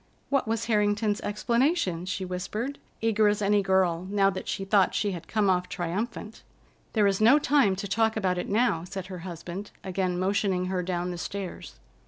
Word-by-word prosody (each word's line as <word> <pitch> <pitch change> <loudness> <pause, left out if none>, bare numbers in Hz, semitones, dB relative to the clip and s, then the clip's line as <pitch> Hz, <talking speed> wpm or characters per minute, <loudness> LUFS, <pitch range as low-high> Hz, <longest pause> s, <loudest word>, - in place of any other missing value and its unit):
"What 275 -4 +1
was 225 0 -1
Harrington's 210 -1 +1
explanation?" 210 - 0
she 185 0 -2
whispered, 210 +9 -4 0.2
eager 220 -1 +3
as 205 0 +2
any 205 0 +3
girl, 185 -2 +1
now 195 -1 +3
that 185 - -6
she 195 - -3
thought 195 -1 +3
she 205 - +1
had 170 -3 -7
come 215 -2 +1
off 180 -1 +1
triumphant. 210 +5 -4 0.5
"There 215 -3 +3
is 195 0 +2
no 235 +7 +7
time 280 -9 +3
to 200 +2 -5
talk 220 +2 +1
about 185 -4 0
it - - -4
now," 210 -6 +2
said 190 +1 -6
her 180 - -6
husband, 175 +3 -7
again 185 -1 -1
motioning 190 0 +1
her 185 0 -1
down 180 0 -2
the 175 - -6
stairs. 195 -1 -6
195 Hz, 185 wpm, -27 LUFS, 185-215 Hz, 0.5 s, no